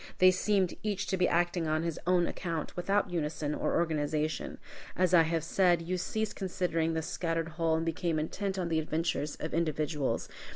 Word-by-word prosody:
They 185 0 +7
seemed 190 -1 +1
each 205 -2 -1
to - - +2
be 180 -1 +3
acting 175 -1 +1
on 155 +1 +1
his 170 -2 -2
own 180 -1 +4
account, 165 -3 -4
without 195 +2 +1
unison 150 -3 -2
or - - -1
organization. 155 -1 -1 0.4
As 185 0 +2
I 170 - +8
have 165 0 0
said, 175 -1 +3
you 180 +2 -2
ceased 220 +4 -2
considering 170 -4 -1
the 160 - -1
scattered 165 -1 -2
whole, 165 0 +1
and 165 +1 -1
became 165 0 -1
intent 190 +5 -2
on 175 -2 -1
the 160 -1 +2
adventures 155 -1 -1
of 155 - -5
individuals. 155 -3 0
165 Hz, 180 wpm, -31 LUFS, 160-180 Hz, 0.4 s, I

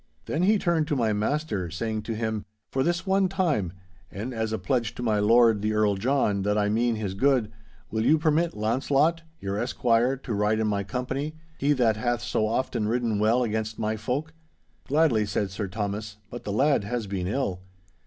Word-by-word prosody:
Then 155 - -1
he 210 +4 +4
turned 170 -5 +1
to 150 - 0
my 115 -5 +1
master, 105 - -1
saying 110 +5 -3
to 115 +1 -4
him, 110 -1 -2 0.3
'For 130 - 0
this 170 +5 0
one 195 0 +3
time, 160 - 0 0.4
and 115 +6 -5
as 110 -1 -2
a 110 - 0
pledge 115 +4 -1
to 125 - -5
my 110 -3 +2
Lord 115 0 +5
the 110 +1 0
Earl 105 -1 +3
John 105 -1 +1
that 105 +2 +1
I 105 -1 +2
mean 115 +2 +1
his 105 -3 -3
good, 120 0 +2 0.4
will 110 0 0
you 155 +6 +5
permit 160 0 +1
Launcelot, 135 +9 +2 0.2
your 100 +1 -3
esquire, 120 +2 +2
to 125 -3 -5
ride 105 +1 +1
in 110 - +1
my 100 -1 0
company—he 145 - -2
that 115 -5 +2
hath 120 +1 -1
so 110 -1 0
oft 130 +4 -1
ridden 115 0 0
well 115 +4 +3
against 110 -1 -2
my 110 0 -1
folk?' 130 +9 -3 0.5
'Gladly,' 145 -7 +3
said 100 -1 -1
Sir 100 +2 -3
Thomas, 105 +1 -4
'but 120 - -8
the 105 - -2
lad 135 +3 +3
has 115 +1 -3
been 95 -2 -3
ill. 100 -5 -1
115 Hz, 195 wpm, -26 LUFS, 105-135 Hz, 0.5 s, Lord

